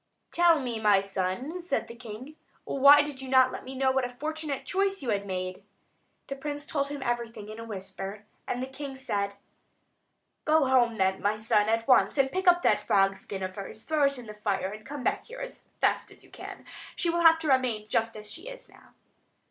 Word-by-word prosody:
"Tell 340 -2 +5
me, 245 -4 -3
my 210 -2 +5
son," 195 - -3
said 350 - -2
the - - -9
king, 240 +5 -9 0.3
"why 280 +2 +7
you 295 0 -3
did 265 -1 -8
not 260 -1 +5
let - - -7
me 265 +1 -8
know 265 0 +2
what 265 0 +1
a 245 - -2
fortunate 305 +2 -4
choice 390 -2 0
you 250 - -3
had 200 -1 -1
made?" 185 0 -4 0.6
The 275 - -5
prince 290 +1 -5
told 280 -2 -1
him 285 -1 -5
everything 235 -4 -3
in 215 +1 -8
a - - -6
whisper; 200 0 -7 0.2
and 250 +1 -2
the - - -1
king 265 0 -7
said: 200 -6 -2 1.1
"Go 310 -1 +4
home 245 -3 +3
then, 190 0 +1
my 205 +1 +1
son, 215 -1 +2
at 225 0 0
once, 255 +2 +4
and 270 -1 +3
pick 375 +1 -2
up 350 0 +6
that - - +3
frog 195 0 +3
skin 195 0 -7
of 185 0 -4
hers; 205 +2 -8
throw 310 -2 +2
it 275 -1 +1
in 245 - -9
the 215 - -8
fire, 200 -2 -2
and 215 +1 -9
come 285 -2 -6
back - - -1
here - - -9
as - - -7 0.2
fast - - +1
as - - -13
you - - -19
can. - - -9
Then - - -28 0.3
she 340 - +1
will 340 0 0
have 325 -1 +7
to 320 -2 -3
remain 250 -5 +1
just 225 +1 0
as 210 0 -9
she 230 - -8
is - - -11
now." - - -20
255 Hz, 225 wpm, -28 LUFS, 210-290 Hz, 1.1 s, why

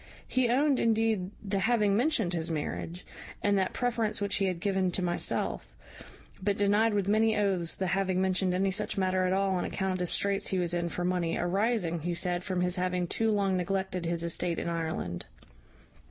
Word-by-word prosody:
He 255 -2 +2
owned, 275 +2 +3
indeed, 220 -4 +1
the 195 -1 -1
having 210 -2 +2
mentioned 230 - +1
his 165 -1 0
marriage, 165 +2 -4 0.4
and 205 0 +3
that 190 - 0
preference 230 -3 -1
which 200 -1 0
he 195 - +1
had 180 -2 -2
given 190 0 +1
to 185 - -1
myself, 175 -1 -2 0.7
but 200 +1 0
denied 205 +2 +3
with 200 -2 0
many 220 +1 +3
oaths 190 -5 +1
the 190 - -2
having 185 0 0
mentioned 185 -1 +1
any 190 +1 +1
such 210 +2 -3
matter 185 -1 +1
at - - 0
all 195 +1 +1
on 180 -1 0
account 190 -1 -2
of 185 - -3
the 180 - -1
straits 200 +3 0
he 190 - 0
was 175 -1 0
in 170 0 -1
for 175 +2 -3
money, 180 -2 0
arising, 185 -1 0
he 170 +2 -2
said, 175 0 -1
from 185 -2 -1
his 180 +1 +1
having 180 0 0
too 225 +6 0
long 200 -3 +1
neglected 185 -1 -2
his 170 0 0
estate 170 0 -1
in - - -3
Ireland. 160 - -3
190 Hz, 195 wpm, -29 LUFS, 175-205 Hz, 0.7 s, owned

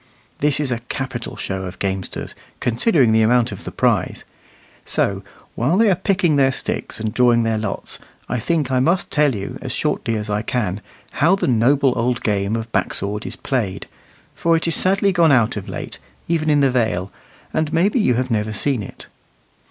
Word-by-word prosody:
This 150 -1 +2
is 145 -4 -1
a 120 - -1
capital 130 -3 -4
show 95 -1 -4
of 90 0 -7
gamesters, 95 -1 -3 0.3
considering 125 - +2
the 110 0 +4
amount 120 +1 +3
of - - -9
the - - -5
prize; - - 0 0.6
so, - - 0 0.3
while 140 +10 +1
they 220 -1 +5
are - - +3
picking 185 -4 +1
their 135 -1 +4
sticks - - -4
and 110 -1 -3
drawing 120 -2 +4
their 110 -1 0
lots, 105 -2 -4 0.3
I 125 - -1
think 150 +1 0
I 130 - +2
must 170 +7 +1
tell 145 -4 +3
you, 100 -1 -6
as - - -5
shortly 115 - -1
as 105 0 -3
I 105 0 -1
can, 105 -4 -2 0.3
how 170 +6 +3
the 195 - -2
noble 130 +2 +3
old 120 0 0
game 100 0 0
of 115 0 -5
back - - 0
sword 105 +2 -3
is - - -4
played; 110 -9 -2 0.5
for 165 0 +2
it 160 - -2
is 165 - +1
sadly 195 +1 +2
gone 170 -4 +4
out 120 -3 +3
of 100 -3 -6
late, - - -6 0.3
even 160 -2 0
in 145 -1 +4
the 135 -2 +3
Vale, 110 -7 0 0.4
and 155 -1 0
maybe 195 - +2
you 125 - +3
have 130 +1 -1
never 110 -1 0
seen 130 +3 0
it. 100 - -9
125 Hz, 195 wpm, -20 LUFS, 110-150 Hz, 0.6 s, they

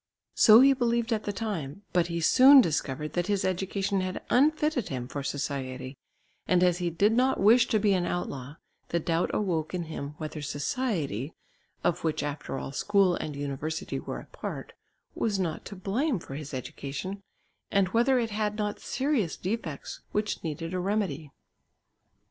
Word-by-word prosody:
So 220 +2 +8
he 275 +1 +7
believed 235 -2 +1
at 215 - -2
the 205 - -1
time, 200 -6 -4
but 175 -1 +3
he 170 -1 -3
soon 265 - +8
discovered 150 - 0
that 175 0 -1
his 200 -2 +1
education 190 +1 -1
had 185 0 -4
unfitted 300 - +2
him 125 -3 -4
for 140 - -5
society, 130 -2 -4 0.5
and 180 -1 +4
as 180 0 +3
he 175 -1 0
did 200 +6 +2
not 255 +3 +2
wish 225 +5 +6
to 220 - +2
be 205 -1 +3
an 180 -2 +1
outlaw 140 -5 -4 0.3
the 170 - +1
doubt 165 +1 0
awoke 175 -5 -1
in 175 - -2
him 150 -2 -6
whether 155 -1 -5
society, 145 - -2 0.5
of 175 - 0
which 155 -3 0
after 145 -1 -4
all 135 - -5
school 195 +4 +3
and 150 -4 -4
university 145 +3 -3
were - - -5
a - - -11
part, - - -7 0.4
was 210 -3 0
not 170 -5 -2
to 200 - -7
blame 225 - 0
for 150 - -9
his 145 +1 -6
education, 140 +8 -5 0.5
and 195 -2 +2
whether 240 +6 +3
it 230 -2 0
had 210 0 -1
not 210 -1 -2
serious 260 - -1
defects 180 -7 -4
which 210 0 -1
needed 165 +1 -4
a 185 - -1
remedy. 180 -6 -1
180 Hz, 170 wpm, -28 LUFS, 150-215 Hz, 0.5 s, So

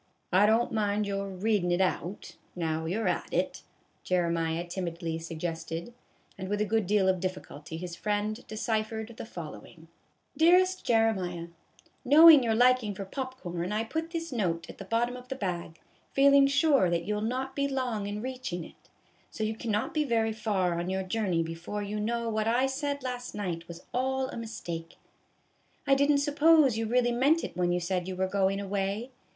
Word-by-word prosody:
" - - -22
I 195 +3 +6
don't 225 +2 +3
mind 210 -1 0
your 200 0 -2
readin' 195 -1 0
it 175 - +2
out, 190 0 -2 0.2
now 160 -2 -2
you 195 +7 -1
're - - 0
at - - -1
it," - - -1 0.4
Jeremiah 170 -2 0
timidly 170 -2 -4
suggested; 165 +3 -5 0.5
and 190 0 -5
with 205 0 -1
a 210 - +2
good 220 -2 0
deal 200 -1 +3
of 185 -1 +2
difficulty 165 -4 -5
his 175 0 -6
friend 210 +4 -2
deciphered 220 +1 -2
the - - -7
following: 160 - -10 0.5
DEAREST 365 +3 +4
JEREMIAH: 190 -7 +1 0.5
Knowing 305 +2 +9
your 225 -2 +1
liking 245 -3 +3
for 195 - -5
pop 260 +5 -5
corn, 175 +1 -4
I 215 +1 0
put 320 +8 -3
this 330 -1 -4
note 175 -9 -1
at - - -18
the 195 - -7
bottom 235 +4 0
of 250 0 -10
the 265 - -4
bag, 175 -7 -4 0.3
feeling 275 0 +6
sure 280 - +3
that 170 0 0
you 210 - -1
'11 210 +2 -1
not 265 +2 -3
be 280 0 +1
long 250 -7 -2
in 210 +2 -4
reaching 255 -9 -4
it; - - -18 0.4
so 220 - -5
you 215 +1 0
cannot 220 +6 -2
be 305 -2 +2
very 225 -4 +1
far 195 -6 0
on 175 +1 -3
your 190 0 -1
journey 185 -4 0
before 165 +5 -5
you 210 +1 -3
know 235 +2 -1
that 230 - -2
what 215 0 0
I 245 +3 +3
said 280 +1 -2
last 250 -1 -5
night 175 -5 -4
was 170 0 -10
all 265 +1 0
a - - -7
mistake. 175 -8 -6 0.9
I 275 - +4
did 280 +1 +3
n't 285 - +3
suppose 295 -2 +4
you 225 0 -1
really 240 +1 +2
meant 280 +7 +3
it - - -5
when 175 0 +1
you 175 - +1
said 180 +1 -2
you 190 - -4
were 190 +1 0
going 195 0 +1
away. 200 +4 -2
210 Hz, 190 wpm, -29 LUFS, 180-250 Hz, 0.9 s, Knowing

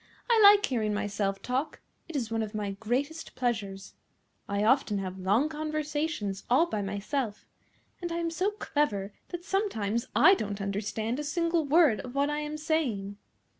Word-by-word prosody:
I 465 -2 +4
like 410 0 +8
hearing 215 -5 -1
myself 200 -1 -2
talk. 260 +5 -2 0.3
It 330 - -7
is 235 -5 -2
one 225 0 0
of 215 0 -4
my 205 -2 -2
greatest 255 +10 -3
pleasures. 205 -6 -2 0.6
I 200 +1 0
often 230 -2 +3
have 190 -1 -4
long 205 +10 +2
conversations 305 -8 -3
all 260 +8 +5
by 215 -12 -3
myself, 205 +4 -3 0.6
and 345 -1 -3
I 335 - -2
am 335 -1 -1
so 365 +4 +1
clever 285 - -1 0.2
that 350 0 -6
sometimes 235 - -1
I 375 - +8
don't 205 - -2
understand 215 +5 -2
a - - -2
single 335 +1 0
word 295 -5 +4
of 250 +1 -8
what 285 +1 +2
I 295 - -1
am 300 0 -4
saying." 255 -11 -1
250 Hz, 170 wpm, -29 LUFS, 205-315 Hz, 0.6 s, like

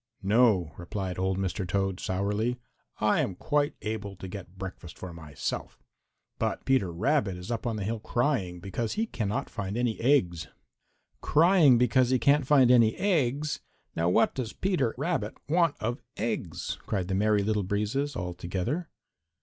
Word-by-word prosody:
"No," 100 -5 +3
replied 90 +1 -4
old 95 0 0
Mr. 95 0 -2
Toad 95 +1 0
sourly. 105 +6 -1 0.4
"I 105 0 +3
am 95 - -2
quite 145 - 0
able 105 -2 -4
to 95 - -8
get 95 -1 -9
breakfast 95 -3 -8
for 90 -2 -7
myself. 80 -4 -5 0.6
But - - -2
Peter 130 -10 +2
Rabbit 100 - +1
is 90 +6 -7
up 115 +1 -2
on 115 - -1
the 105 - -3
hill 110 +3 -2
crying 115 -7 0
because 110 +5 -3
he 225 - 0
cannot 110 - -2
find 100 -1 -4
any 120 -2 0
eggs." 95 - +2 0.7
"Crying 160 -5 +5
because 125 +1 +3
he 130 - +4
cannot 140 +3 +3
find 135 -4 +6
any 115 -3 +5
eggs! 150 -6 0 0.4
Now 85 +1 +1
what 90 - +3
does 120 -4 -4
Peter 170 - 0
Rabbit 140 -7 -2
want 165 0 +3
of 120 +3 -2 0.2
eggs?" 90 -7 -3
cried 95 -4 -1
the 95 - -2
Merry 105 +1 +2
Little 105 0 +1
Breezes 105 +9 -1
all 90 -5 -3
together. 95 - -3
110 Hz, 160 wpm, -28 LUFS, 95-130 Hz, 0.7 s, find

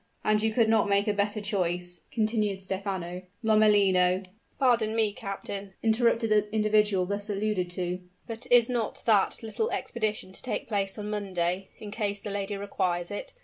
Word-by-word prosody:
"And 215 0 +3
you 220 0 +1
could 225 0 +3
not 220 -2 +3
make 200 +1 +3
a 210 - +2
better 205 +1 0
choice," 180 -4 -2
continued 215 -3 0
Stephano. 190 -2 -4 0.2
"Lomellino 200 -4 +4 0.2
" - - -40
"Pardon 235 -5 +2
me, 220 -2 +2
captain," 195 -1 -6
interrupted 230 0 +2
the 210 0 +2
individual 210 -3 +2
thus 200 +2 -4
alluded 205 -3 -1
to: 180 0 -3 0.3
"but 225 0 -6
is 245 -1 +7
not 240 -3 -2
that 215 0 +3
little 440 - -2
expedition 215 -4 -2
to - - -6
take 255 - -3
place 200 -3 -1
on 210 0 -4
Monday, 190 -2 -2
in 210 -1 -8
case 205 -2 -2
the 205 - -6
lady 200 0 -3
requires 185 -3 -2
it? 205 - -6
205 Hz, 170 wpm, -28 LUFS, 190-220 Hz, 0.3 s, is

